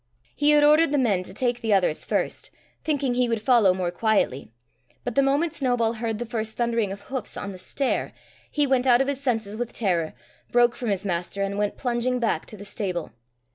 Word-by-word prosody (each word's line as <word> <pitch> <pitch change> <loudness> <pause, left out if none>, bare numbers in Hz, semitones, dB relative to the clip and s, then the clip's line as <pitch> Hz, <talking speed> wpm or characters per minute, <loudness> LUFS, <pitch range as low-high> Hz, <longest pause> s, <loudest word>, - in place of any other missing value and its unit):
He 290 0 +3
had 295 0 +6
ordered 300 +1 +5
the 295 - +2
men 215 -9 +2
to 185 - -8
take 240 +3 -1
the 220 -3 +1
others 180 -5 0
first, - - -2 0.3
thinking 285 -5 0
he 245 0 +1
would 230 -1 0
follow 225 -4 +4
more 180 -1 -1
quietly. 200 - 0 0.5
But 245 - -3
the 275 - +4
moment 285 +4 +1
Snowball 245 -4 +1
heard 225 -1 -3
the 240 - -4
first 220 -2 -4
thundering 235 -4 0
of 200 +1 -7
hoofs 260 +1 -5
on 200 - -4
the 185 - -10
stair, 270 +8 -2 0.4
he 295 -1 +2
went 265 -1 +1
out 245 0 +6
of 270 - 0
his 280 -1 -2
senses 225 -6 -1
with 240 +1 -4
terror, 175 - -1 0.4
broke 240 0 +4
from 240 - -3
his 200 0 -1
master, 180 +2 -2
and 195 0 -2
went 205 0 -1
plunging 250 0 0
back 235 -3 -1
to 215 - -11
the 205 - -10
stable. 190 -5 -3
235 Hz, 215 wpm, -25 LUFS, 200-255 Hz, 0.5 s, had